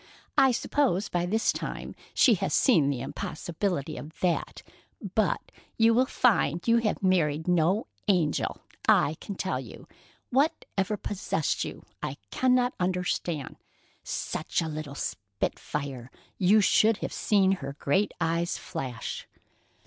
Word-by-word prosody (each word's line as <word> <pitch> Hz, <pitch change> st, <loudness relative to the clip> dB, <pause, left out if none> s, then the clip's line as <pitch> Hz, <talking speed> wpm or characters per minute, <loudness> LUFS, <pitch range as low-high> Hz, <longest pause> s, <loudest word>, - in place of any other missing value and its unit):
I 265 Hz, -, +6 dB
suppose 235 Hz, -6 st, +1 dB
by 175 Hz, 0 st, 0 dB
this 220 Hz, +4 st, +2 dB
time -, -, -5 dB, 0.2 s
she -, -, +6 dB
has -, -, 0 dB
seen 160 Hz, -, +4 dB
the 135 Hz, -4 st, -2 dB
impossibility 160 Hz, +3 st, -3 dB
of 155 Hz, +2 st, -10 dB
that, 175 Hz, -2 st, -1 dB, 0.5 s
but -, -, 0 dB, 0.3 s
you 225 Hz, 0 st, +5 dB
will 255 Hz, +3 st, +3 dB
find 190 Hz, -, +2 dB
you 230 Hz, 0 st, +5 dB
have 220 Hz, -3 st, 0 dB
married 160 Hz, -4 st, +2 dB
no 180 Hz, +4 st, +2 dB, 0.2 s
angel, 175 Hz, -7 st, +1 dB, 0.3 s
I 145 Hz, -, +5 dB
can 200 Hz, -, -6 dB
tell 190 Hz, 0 st, -2 dB
you. -, -, -10 dB, 0.4 s
Whatever 245 Hz, -, 0 dB
possessed 185 Hz, -6 st, -1 dB
you, -, -, -7 dB, 0.2 s
I 140 Hz, -, -4 dB
cannot 250 Hz, -1 st, +3 dB
understand. 180 Hz, -4 st, -1 dB, 0.5 s
Such -, -, -2 dB
a 165 Hz, -, -1 dB
little 155 Hz, -2 st, -5 dB
spitfire! 125 Hz, +6 st, -4 dB, 0.3 s
You 200 Hz, +4 st, +5 dB
should 215 Hz, +2 st, +4 dB
have -, -, -5 dB
seen 195 Hz, -3 st, +3 dB
her 140 Hz, -8 st, -3 dB
great 190 Hz, +9 st, +2 dB
eyes 170 Hz, +1 st, 0 dB
flash." 125 Hz, -4 st, -5 dB
180 Hz, 130 wpm, -28 LUFS, 150-210 Hz, 0.5 s, I